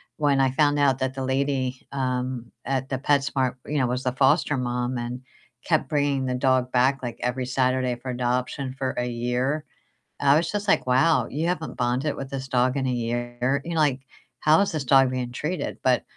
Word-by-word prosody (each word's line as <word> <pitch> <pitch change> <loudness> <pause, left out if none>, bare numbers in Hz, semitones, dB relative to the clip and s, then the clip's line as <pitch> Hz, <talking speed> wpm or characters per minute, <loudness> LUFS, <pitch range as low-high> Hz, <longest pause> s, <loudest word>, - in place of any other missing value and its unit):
when 145 -3 +2
I 135 -1 +3
found 145 +1 +2
out 135 -2 +3
that 130 0 -2
the 135 - -3
lady, 130 -1 -1
um, 130 -2 -2
at 135 0 -2
the 135 - -2
PetSmart, 135 -2 +1
you 150 - -2
know, 130 -3 +2
was 125 +1 -2
the 125 -1 0
foster 145 +3 +3
mom 125 0 -2
and 120 +1 -4 0.4
kept 155 -3 +1
bringing 145 -3 +1
the 125 - -1
dog 130 -1 +1
back, 130 +2 +2
like, 120 - -5
every 125 +1 -1
Saturday 130 -1 +1
for 130 +2 -8
adoption 125 +2 -2
for 130 -1 -2
a 125 - 0
year, 125 +5 -1 0.6
I 140 +1 +6
was 165 0 0
just 205 0 -3
like, 195 - +3
"Wow, 130 +6 +3
you 155 +4 -1
haven't 165 -3 -3
bonded 125 +4 0
with 135 0 -6
this 135 -1 -5
dog 130 0 +1
in 135 - -1
a 130 - 0
year? 120 +2 -1
You 170 - -4
know, 160 - 0
like, 135 -3 +2 0.4
how 155 +3 +5
is 200 - +1
this 155 -3 -2
dog 135 -1 +5
being 125 -1 -3
treated?" 150 +4 -3
But 125 -1 +3
130 Hz, 205 wpm, -25 LUFS, 125-140 Hz, 0.6 s, I